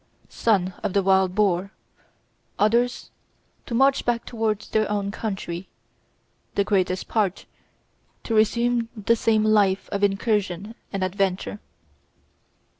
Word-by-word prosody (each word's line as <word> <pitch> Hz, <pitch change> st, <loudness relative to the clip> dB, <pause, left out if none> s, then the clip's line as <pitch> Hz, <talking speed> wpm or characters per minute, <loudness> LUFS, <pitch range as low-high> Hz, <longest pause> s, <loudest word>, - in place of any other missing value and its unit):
son 190 Hz, -5 st, +1 dB
of -, -, -2 dB
the 200 Hz, -, +2 dB
wild 190 Hz, -1 st, +3 dB
boar; 195 Hz, -2 st, +1 dB, 0.9 s
others 235 Hz, +4 st, +1 dB, 0.6 s
to 235 Hz, -, -3 dB
march 270 Hz, +2 st, +3 dB
back 235 Hz, -1 st, -1 dB
towards 220 Hz, -3 st, -2 dB
their 215 Hz, -1 st, +1 dB
own 200 Hz, -1 st, -1 dB
country; 195 Hz, -4 st, -5 dB, 0.9 s
the 200 Hz, -, +3 dB
greatest 185 Hz, -2 st, 0 dB
part 205 Hz, -5 st, -1 dB, 0.8 s
to 230 Hz, -, -3 dB
resume 235 Hz, +2 st, +2 dB
the 215 Hz, +3 st, +2 dB
same 220 Hz, -1 st, +2 dB
life 205 Hz, -3 st, +3 dB
of 200 Hz, 0 st, -2 dB
incursion 205 Hz, -1 st, 0 dB, 0.2 s
and 195 Hz, -2 st, -2 dB
adventure. 190 Hz, +1 st, -1 dB
205 Hz, 115 wpm, -24 LUFS, 190-225 Hz, 0.9 s, wild